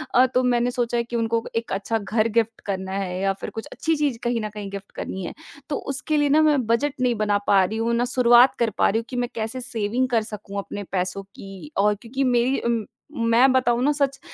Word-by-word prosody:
अ, 255 +1 +7
तो 255 0 +1
मैंने 245 0 +2
सोचा 240 -1 -1
है 235 - +1
कि 235 0 -7
उनको 230 0 0
1 230 0 -2
अच्छा 205 +3 -1
घर 215 +2 0
गिफ्ट 225 0 +1
करना 190 -1 -3
है 190 -2 -3
या 195 0 +1
फिर - - -4
कुछ 225 - -7
अच्छी 320 0 0
चीज़ 290 -5 0
कहीं 240 -1 0
ना 215 - -3
कहीं 205 -1 -7
गिफ्ट 200 0 -8
करनी 190 -1 -5
है। - - -5 0.4
तो 290 - -1 0.2
उसके 300 +2 -1
लिए 290 -1 +2
ना 310 +2 +5
मैं 290 -6 +3
बजट 265 +5 +1
नहीं 245 -2 +2
बना 205 -1 +1
पा 195 -2 +5
रही 220 +4 -2
हूँ, 230 +1 0
ना 240 +1 +1
शुरुआत 245 0 +5
कर 235 -2 +2
पा - - +4
रही 220 +3 +1
हूँ 230 - -7
कि 255 - -6
मैं 245 0 -1
कैसे 225 +3 -3
सेविंग 235 +3 0
कर 230 -2 +2
सकूँ 205 -2 -8
अपने 205 +1 -6
पैसों 185 +1 -2
की 195 +10 -10
और 210 +1 +3
क्योंकि 260 +3 -2
मेरी 250 +1 +2
उम, 230 -3 0 0.5
मैं 255 +3 +6
बताऊँ 245 -2 +2
ना 295 - +3
सच, 275 -1 0
235 Hz, 245 wpm, -23 LUFS, 210-255 Hz, 0.5 s, अ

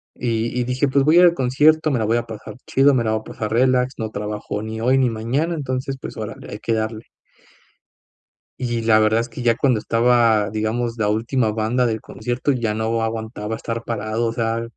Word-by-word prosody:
y 115 0 -1
y - - +1
dije: 125 +3 0
"Pues 135 0 +2
voy 155 +3 +5
al 175 -1 +7
concierto, 150 +3 +3
me 130 - +1
la 110 - 0
voy 115 +2 +2
a 120 - -1
pasar 110 -2 -9
chido, 140 +1 +4
me 125 -3 +2
la 110 - 0
voy 110 - -1
a - - -18
pasar 110 -1 -5
relax, 125 +2 +2
no 110 -1 -3
trabajo 105 0 -4
ni 110 0 -5
hoy 130 +3 +3
ni 130 -2 +3
mañana, 125 +10 -1
entonces, 135 -2 -3
pues - - -7
órale, 110 -1 -7
hay 105 - -6
que 115 - -1
darle". 110 0 -2 1.6
Y 120 -2 -2
la 110 -1 +4
verdad 110 +1 +3
es 120 - -6
que 115 - -8
ya 120 -1 +3
cuando 125 -5 +2
estaba, 115 -2 +3
digamos, 115 +2 -2
la 105 - +1
última 115 +2 0
banda 110 +4 0
del 110 -2 -2
concierto 120 +5 -2
ya 120 -5 -1
no 110 +1 -1
aguantaba 110 -1 -3
estar 115 +1 -5
parado, 115 0 -2
o 115 - -2
sea, 115 0 -1
115 Hz, 210 wpm, -21 LUFS, 110-125 Hz, 1.6 s, al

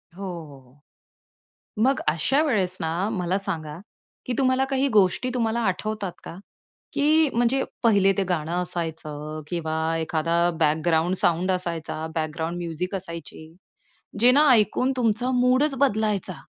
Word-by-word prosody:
हो, 200 - -8
हो, 175 -4 -6
हो. 130 +3 -24 1.0
मग 270 +2 +2
अशा 215 - +2
वेळेस 195 - 0
ना, 170 +5 -1
मला 185 -3 -1
सांगा 155 -5 -4 0.5
की 250 - -2
तुम्हाला 260 0 +2
काही 270 +1 +1
गोष्टी 205 +5 +3
तुम्हाला 230 -1 0
आठवतात 205 0 -2
का? - - -8 0.6
की 305 +1 +3
म्हणजे 245 +3 +2 0.2
पहिले 200 -4 +4
ते 195 - +2
गाणं 165 -2 -2
असायचं 155 -3 -5
किंवा 160 -2 -3 0.2
एखादा 165 +1 -1 0.2
बॅकग्राउंड 160 +3 +2
साउंड 175 +2 +4
असायचा, 165 -3 -3
बॅकग्राऊंड 160 +2 -3
म्युझिक 175 +3 -4
असायची 165 -3 -8 0.7
जे 245 +1 +7
ना, 295 +2 +5
ऐकून 250 +3 +3
तुमचा 240 +1 0
मूडच 255 +3 +2
बदलायचा 210 -8 0
185 Hz, 130 wpm, -24 LUFS, 165-240 Hz, 1.0 s, जे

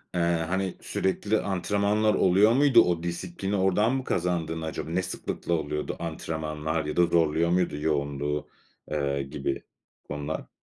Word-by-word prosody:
eee, - - +1
hani, 85 +3 0
sürekli 105 +3 0
antrenmanlar 100 +3 +1
oluyor 95 +4 +5
muydu, 135 -3 +6
o 85 -5 0
disiplini 85 +3 -3
oradan 100 +5 +2
mı 135 - -2
kazandın 85 -5 -1
acaba? 80 0 -4
Ne 90 +3 +1
sıklıkla 90 -1 -3
oluyordu 75 -2 -2
antrenmanlar 80 -1 -3
ya 75 - -4
da 85 - +6
zorluyor 85 0 +2
muydu 90 -3 +1
yoğunluğu, 75 -1 -1 0.4
eee, 70 -2 0
gibi 70 0 -3 0.5
konular? 75 +2 -4
85 Hz, 135 wpm, -27 LUFS, 75-95 Hz, 0.5 s, muydu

